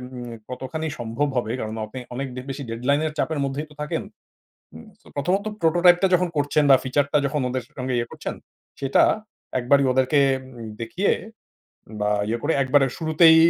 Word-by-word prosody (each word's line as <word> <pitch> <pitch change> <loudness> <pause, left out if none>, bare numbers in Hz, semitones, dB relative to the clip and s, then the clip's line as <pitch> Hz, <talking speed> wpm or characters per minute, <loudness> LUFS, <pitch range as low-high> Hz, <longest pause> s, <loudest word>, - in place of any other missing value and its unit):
উম 120 -1 -6 0.2
কতখানি 130 +5 -4
সম্ভব 120 +5 -1
হবে? 115 -2 0
কারণ 110 -1 -4
আপনি 130 +4 -7 0.2
অনেক 135 +2 -2
ডে 125 - -4
বেশি 135 +1 -4
deadline 125 +6 +1
এর 155 - -5
চাপের 160 0 0
মধ্যেই 135 +3 -3
তো - - -15
থাকেন। 150 - -2 0.7
উম - - -11
সো - - -30
১ম 155 +6 0
ত - - -12 0.2
prototype 175 +2 +5
টা - - +6
যখন 180 0 +3
করছেন 145 +1 +2
বা 135 - +10
ফিচার 135 +2 +2
টা - - +5
যখন 145 +1 -1
ওদের 130 0 -2 0.2
সঙ্গে 130 0 -2
ইয়ে 120 0 -2
করছেন, - - -5 0.5
সেটা 135 -1 +4 0.6
একবারই 135 +3 +4
ওদেরকে 130 +3 +3 0.4
উম 115 - -6
দেখিয়ে 170 - 0 0.9
বা 105 0 +1 0.2
ইয়ে 115 +2 0
করে 155 - +1
একবারে 135 +1 +4
শুরুতেই 160 0 +6
140 Hz, 180 wpm, -24 LUFS, 125-155 Hz, 0.9 s, বা